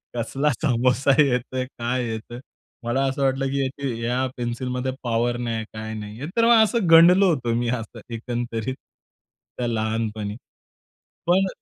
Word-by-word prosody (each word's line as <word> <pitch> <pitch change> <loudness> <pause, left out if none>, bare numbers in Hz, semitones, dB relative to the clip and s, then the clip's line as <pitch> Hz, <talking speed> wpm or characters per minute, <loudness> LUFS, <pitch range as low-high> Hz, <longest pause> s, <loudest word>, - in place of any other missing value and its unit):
कसला 135 +5 0
समोसा 130 0 +2
येतोय, 130 -1 0
काय 125 0 -3
येतोय? 110 +2 -6 0.4
मला 120 +4 0
असं 135 +1 -2
वाटलं 135 0 +1 0.3
की 125 -5 -3
या 125 +2 0
पेन्सिलमध्ये 125 +2 -2
पॉवर 120 +1 0
नाही 115 -2 -3
काय 110 0 -6
नाही. 110 +4 -7
तर 230 - +5
मग 230 -2 +7
असं 220 -5 0
गंडलो 180 +4 +7
होतो 120 -5 -1
मी 120 0 0
असं 115 -1 -4 0.2
एकंदरीत 120 +1 -3 0.8
त्या 120 -1 -1
लहानपणी 110 -2 -2 0.9
पण. 190 +2 +4
120 Hz, 135 wpm, -23 LUFS, 115-135 Hz, 0.9 s, मग